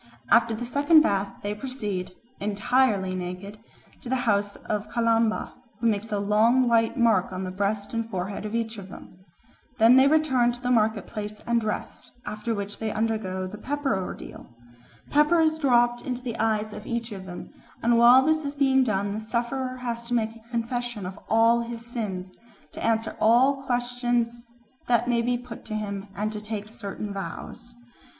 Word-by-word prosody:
After 230 -1 +5
the 240 +2 -4
second 290 +6 +5
bath 200 -8 +1
they 205 0 -1
proceed, 210 -6 -4 0.3
entirely 205 -1 +1
naked, 185 +3 -6 0.4
to 245 - -7
the 260 - +1
house 205 -2 +1
of 210 -1 -4
Kalamba, 230 -1 +1 0.3
who 235 - -3
makes 220 -1 0
a 205 - 0
long 220 +5 +3
white 230 +1 +2
mark 225 -7 +3
on 185 0 -4
the 185 - -4
breast 200 +2 -2
and 230 0 -2
forehead 190 0 -4
of 215 +1 -4
each 225 -2 -2
of 195 -1 -10
them. 185 -1 -13 0.5
Then 230 +3 +7
they 265 +1 +7
return 265 -6 +3
to 240 - -9
the 245 0 -1
market 220 -4 +2
place 210 -1 -6
and 235 0 +2
dress, 215 -1 -4 0.2
after 215 +2 -3
which 205 0 -5
they 220 - -2
undergo 215 -4 -1
the 205 +3 -8
pepper 285 -2 -1
ordeal. 190 -1 -6 0.6
Pepper 300 +4 +4
is 315 -1 +2
dropped 240 -4 +3
into 250 -1 -4
the 235 -3 -4
eyes 215 -1 0
of 210 - -9
each 235 -1 -3
of 190 -2 -7
them, 175 -1 -8 0.3
and 235 +1 +4
while 240 +3 +7
this 315 0 +2
is 285 0 -4
being 265 -2 +4
done 200 -3 0
the 215 - -4
sufferer 255 +3 -2
has 235 -1 -3
to 245 - 0
make 225 -1 0
a 230 0 -18
confession 240 -2 -3
of 190 +2 -7
all 230 +1 +4
his 235 0 -6
sins, 200 -6 -4 0.4
to - - -8
answer 225 0 0
all 260 +5 +4
questions 240 -1 -1 0.4
that 240 0 +2
may 240 -1 +2
be 245 +1 0
put 245 -2 -10
to 215 - -4
him, 200 -1 -4
and 210 +1 -2
to 210 -1 -5
take 210 -1 -5
certain 215 -2 -6
vows. 235 +4 -7
230 Hz, 185 wpm, -26 LUFS, 205-245 Hz, 0.6 s, Then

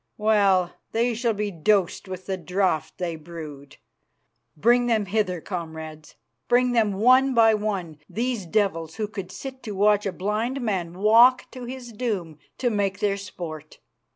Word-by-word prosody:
Well, 200 -4 +3 0.2
they 235 +2 +1
shall 230 -1 0
be 210 0 -2
dosed 195 +2 +1
with 185 0 -7
the 190 - -2
draught 185 -2 -1
they 175 -2 -3
brewed. 150 -4 -10 0.8
"Bring 240 +7 +4
them 220 -3 +2
hither, 190 -2 0
comrades, 160 -4 -7 0.3
bring 245 +1 +3
them 220 -4 +2
one 255 +6 +4
by 225 -1 +6
one, 195 -7 -3
these 230 -4 -2
devils 165 -4 0
who 215 -1 -2
could 195 -3 -7
sit 265 -1 -8
to 215 - -6
watch 205 +1 +3
a - - -1
blind 215 +8 -2
man 185 -8 -2
walk 230 +5 +6
to 255 -1 -8
his 245 -1 -8
doom 200 - -3 0.2
to 245 -2 0
make 200 -2 0
their 205 -1 +1
sport. 170 -6 -8
205 Hz, 155 wpm, -24 LUFS, 175-230 Hz, 0.8 s, by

